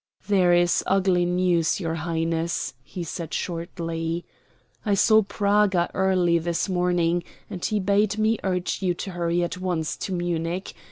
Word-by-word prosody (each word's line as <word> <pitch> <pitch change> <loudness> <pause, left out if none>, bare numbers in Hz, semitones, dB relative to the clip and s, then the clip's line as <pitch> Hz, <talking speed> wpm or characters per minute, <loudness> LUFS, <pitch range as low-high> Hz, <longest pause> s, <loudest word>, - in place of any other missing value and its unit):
"There 190 -4 +4
is 175 0 +3
ugly 190 -2 +3
news, 180 -1 +1
your 165 -3 -2
Highness," 165 -2 -2
he 175 +7 -7
said 165 0 -5
shortly. 165 -1 -3 0.6
"I 205 -3 +2
saw 220 +2 +5
Praga 200 -3 +1
early 185 -3 +2
this 170 +3 -1
morning, 175 -2 +1 0.3
and 180 - -6
he 215 - 0
bade 205 +2 +2
me 220 0 +2
urge 185 0 -1
you 180 -2 +1
to 190 - -5
hurry 175 0 0
at 175 +1 -3
once 175 -4 -2
to - - -5
Munich. 175 0 -2
175 Hz, 150 wpm, -24 LUFS, 170-190 Hz, 0.6 s, saw